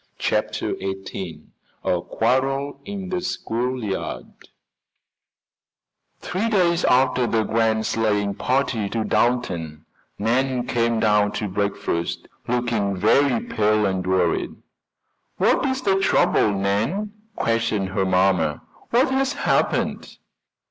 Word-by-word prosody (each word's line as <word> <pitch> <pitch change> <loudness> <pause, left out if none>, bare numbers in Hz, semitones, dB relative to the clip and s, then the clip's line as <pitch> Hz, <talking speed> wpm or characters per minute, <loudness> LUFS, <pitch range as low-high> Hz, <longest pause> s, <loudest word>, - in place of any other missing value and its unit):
CHAPTER - - -1
XVIII 95 -4 -6 0.4
A 90 - +1
QUARREL 135 +7 0
IN 195 -2 -6
THE 180 -1 -2
SCHOOLYARD 125 - -3 1.9
Three 205 +6 -2
days 175 -5 +2
after 125 -1 +3
the 110 -1 +1
grand 110 0 +1
sleighing 105 -3 0
party 125 -3 0
to 115 +1 -1
Dalton, 85 -12 -1 0.3
Nan 125 +3 0
came 115 -2 +1
down 105 -2 +3
to 105 - -2
breakfast 100 -3 -2 0.2
looking 115 -5 0
very 120 +6 +3
pale 105 0 +1
and 95 -2 -1
worried. 90 -2 +1 0.8
"What - - +3
is 260 0 -2
the 195 -1 +2
trouble, 150 - +3
Nan?" 105 - -1 0.2
questioned 115 -4 0
her 95 0 0
mamma. 90 -5 +2 0.3
"What 255 +3 +3
has 270 +1 +1
happened?" 285 - 0
115 Hz, 105 wpm, -23 LUFS, 100-135 Hz, 1.9 s, after